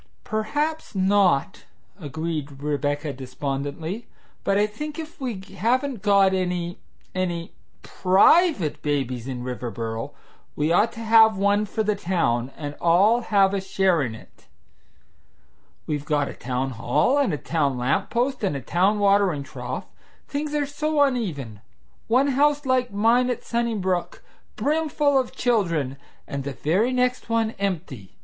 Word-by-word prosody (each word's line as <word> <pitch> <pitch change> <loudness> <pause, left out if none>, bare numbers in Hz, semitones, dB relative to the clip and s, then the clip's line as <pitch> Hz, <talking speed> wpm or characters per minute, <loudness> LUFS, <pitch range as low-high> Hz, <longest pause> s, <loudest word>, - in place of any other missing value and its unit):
"Perhaps 290 +8 -2
not," 190 -3 +2 0.3
agreed 150 -2 -5
Rebecca 145 0 -1
despondently, 140 - -5 0.4
"but 195 - +2
I 205 - +4
think 295 +9 -6
if 320 -2 -8
we 240 -7 -3 0.2
haven't 245 +4 0
got 200 -2 +4
any 180 -1 -2 0.3
any 175 -3 -3 0.3
PRIVATE 195 - +3
babies 130 -4 -2
in 125 -2 -5
Riverboro 115 -2 -4 0.4
we 150 +2 0
ought 210 +6 +3
to 230 - -8
have 220 -2 +6
one 200 +2 +2
for 220 +2 -1
the 210 0 +1
town, 150 -11 0
and 145 -2 -5
all 195 +8 +4
have 200 -4 +3
a 195 - 0
share 190 -3 +2
in 115 -5 -3
it. - - -17 1.4
We've 150 -2 -2
got 145 -2 0
a - - -6
town 130 +1 -3
hall 145 - +1
and 275 -8 +2
a 150 - -1
town 145 -4 -1
lamp 135 +11 0
post 250 +1 -1
and 190 -8 0
a - - -2
town 185 - +1
watering 200 -7 +3
trough. - - -6 0.4
Things 295 +1 -3
are 295 -1 +1
so 300 +2 -2
uneven! 160 - -2 0.5
One 260 +5 +3
house 290 +2 +2
like 255 -2 +1
mine 230 +5 +3
at 245 - -3
Sunnybrook, 210 -7 -1 0.3
brimful 295 -2 +1
of 255 - -2
children, 170 - 0 0.3
and 140 -1 -4
the 140 0 -4
very 180 - +1
next 250 -1 0
one 225 -1 +1
empty! 160 - -4
190 Hz, 140 wpm, -24 LUFS, 145-235 Hz, 1.4 s, have